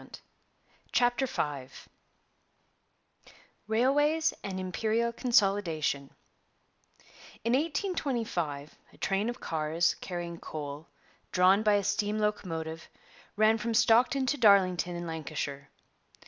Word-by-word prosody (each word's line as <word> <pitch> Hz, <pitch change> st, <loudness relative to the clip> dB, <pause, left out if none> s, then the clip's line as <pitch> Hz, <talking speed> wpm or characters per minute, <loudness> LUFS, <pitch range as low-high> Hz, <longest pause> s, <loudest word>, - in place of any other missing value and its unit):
600. -, -, -12 dB, 0.8 s
CHAPTER 245 Hz, +2 st, +2 dB
V 145 Hz, -, -3 dB, 2.0 s
RAILWAYS 290 Hz, +8 st, +2 dB
AND 190 Hz, -1 st, -4 dB
IMPERIAL 220 Hz, +5 st, -1 dB
CONSOLIDATION 195 Hz, -, +1 dB, 1.3 s
In 230 Hz, -, +1 dB
1825 250 Hz, -, -2 dB
a -, -, -18 dB
train 200 Hz, +3 st, 0 dB
of 240 Hz, -, -5 dB
cars, 160 Hz, +2 st, 0 dB
carrying 175 Hz, -2 st, -5 dB
coal, 150 Hz, 0 st, -7 dB, 0.4 s
drawn 185 Hz, +3 st, +4 dB
by 210 Hz, -1 st, +3 dB
a 205 Hz, -1 st, +2 dB
steam 205 Hz, +1 st, 0 dB
locomotive, 165 Hz, -6 st, -3 dB, 0.5 s
ran 215 Hz, +1 st, +4 dB
from 230 Hz, +1 st, -2 dB
Stockton 245 Hz, +4 st, +4 dB
to 290 Hz, +3 st, 0 dB
Darlington 185 Hz, -5 st, +4 dB
in 175 Hz, 0 st, -5 dB
Lancashire. 150 Hz, -4 st, -5 dB
200 Hz, 100 wpm, -29 LUFS, 165-235 Hz, 2.0 s, drawn